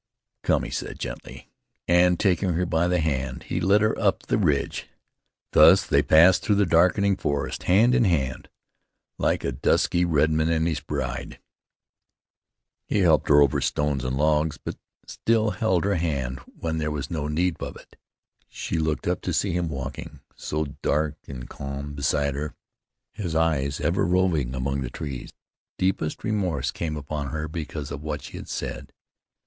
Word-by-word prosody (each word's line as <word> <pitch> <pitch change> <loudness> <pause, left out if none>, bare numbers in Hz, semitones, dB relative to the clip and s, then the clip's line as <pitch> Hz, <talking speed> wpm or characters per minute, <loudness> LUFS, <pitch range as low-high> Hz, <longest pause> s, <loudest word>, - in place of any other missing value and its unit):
"Come," - - +1
he - - -6
said - - -4
gently, - - -8 0.4
and, 90 0 +4
taking 95 -2 +2
her 90 +2 0
by 85 0 +1
the 90 0 +1
hand, 70 -5 -2
he 90 - -3
led 100 +3 +4
her 110 +1 +2
up 100 -3 +1
the - - 0
ridge. 75 -8 0 0.6
Thus - - +7
they - - +3
passed 85 +4 +6
through 105 - +2
the 100 0 +3
darkening 90 +4 +3
forest, 70 -6 -2
hand 110 +7 +5
in 125 -3 +4
hand, 70 -8 -1 0.7
like - - +1
a - - -1
dusky 70 +6 +2
redman 80 -1 +2
and 80 -1 +1
his 80 -4 -1
bride. - - -4 1.5
He 105 - +1
helped 80 -6 +3
her 75 0 +7
over 70 - +1
stones 75 -3 0
and 65 +1 -2
logs, 75 +1 +2
but - - -6 0.3
still 110 -1 +1
held 95 -6 +1
her 100 +1 +1
hand 70 -7 -2
when 80 -1 -4
there 75 -1 -1
was 70 -2 -4
no 75 -3 -2
need 85 +3 0
of - - -6
it. - - -16 0.5
She 80 - -3
looked 80 -1 -1
up - - 0
to - - -2
see 100 - +1
him 85 -1 -1
walking, 70 -3 -6
so 75 +1 -2 0.2
dark 75 0 0
and 60 -3 -7
calm 70 +1 -6
beside 70 0 0
her, 75 +2 -5 0.6
his 90 -6 -4
eyes 75 -4 +1
ever 85 +6 +1
roving 85 -8 +1
among 70 +1 -2
the 65 - -3
trees. 70 -2 -6 0.5
Deepest 90 -4 -1
remorse 90 - -1
came 80 -2 -4
upon 70 0 -4
her 75 +3 -3
because 75 -2 -6
of - - -5
what 75 -1 -4
she - - -8
had - - -9
said. - - -5
80 Hz, 170 wpm, -25 LUFS, 70-90 Hz, 1.5 s, Thus